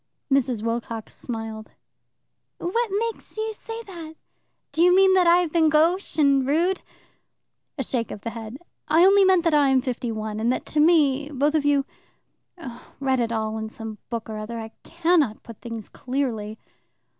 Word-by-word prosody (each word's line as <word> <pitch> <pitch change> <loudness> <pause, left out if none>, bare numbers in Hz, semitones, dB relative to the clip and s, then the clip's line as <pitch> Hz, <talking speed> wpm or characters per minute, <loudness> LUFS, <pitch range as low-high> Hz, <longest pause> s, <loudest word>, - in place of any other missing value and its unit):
Mrs. 250 -5 +1
Wilcox 230 -1 -4
smiled. 225 -2 -6 0.9
"What 460 +6 -1
makes 440 +3 -4
you 440 0 -2
say 455 +2 -8
that? 335 -6 -10 0.6
Do 325 - -1
you 360 +1 +6
mean 380 0 +6
that 365 -2 +4
I 340 +1 +7
have 340 -3 -2
been 325 -2 +4
gauche 330 +6 +2
and 280 -3 +4
rude?" 345 +6 +1 1.0
A 270 - -1
shake 235 -2 -2
of 205 - -8
the 230 - -4
head. 225 +1 -8 0.3
"I 325 +4 +5
only 395 +1 +6
meant 375 -2 +4
that 330 -3 +2
I 290 -2 +4
am 265 -1 +4
fifty 250 -2 -3
one, 215 -1 -4
and 230 +2 +1
that - - -2
to 300 - -2
me 295 -3 +3
both 290 +1 0
of 305 -2 +1
you 285 -1 +3 1.1
Read 265 -2 +1
it 230 -1 0
all 220 -1 -2
in 220 0 -5
some 220 -1 -8
book 230 -2 -4
or 215 -1 -5
other; 225 +2 -6
I 220 0 -7
cannot 330 -9 +1
put 230 -3 -12
things 230 -3 -7
clearly." 235 -5 -3
275 Hz, 180 wpm, -24 LUFS, 230-340 Hz, 1.1 s, I